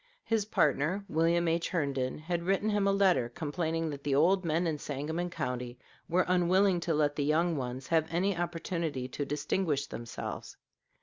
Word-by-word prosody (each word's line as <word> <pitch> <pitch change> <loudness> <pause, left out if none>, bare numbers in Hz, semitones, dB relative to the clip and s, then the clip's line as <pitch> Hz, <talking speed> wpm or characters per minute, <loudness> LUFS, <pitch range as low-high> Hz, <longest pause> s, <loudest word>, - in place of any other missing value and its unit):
His 225 -3 0
partner, 170 +1 +1
William 170 +2 +2
H. 165 +1 0
Herndon, 140 -6 -1
had 170 +2 -2
written 195 +4 +1
him 205 -1 +2
a - - +4
letter, 190 -11 +3
complaining 160 +3 -2
that 140 -1 -7
the 140 -1 +1
old 185 +6 +4
men 165 +1 +1
in 155 -3 -1
Sangamon 155 +6 -3
County 125 -5 -4 0.3
were 180 +2 +3
unwilling 185 +1 +3
to 165 -2 -1
let 145 -1 +2
the 145 - 0
young 165 +3 +2
ones 130 -1 -4
have 160 -1 +2
any 185 +4 +1
opportunity 165 -5 -3
to 145 +2 -3
distinguish 150 0 -1
themselves. 115 0 -7
165 Hz, 170 wpm, -30 LUFS, 145-180 Hz, 0.3 s, a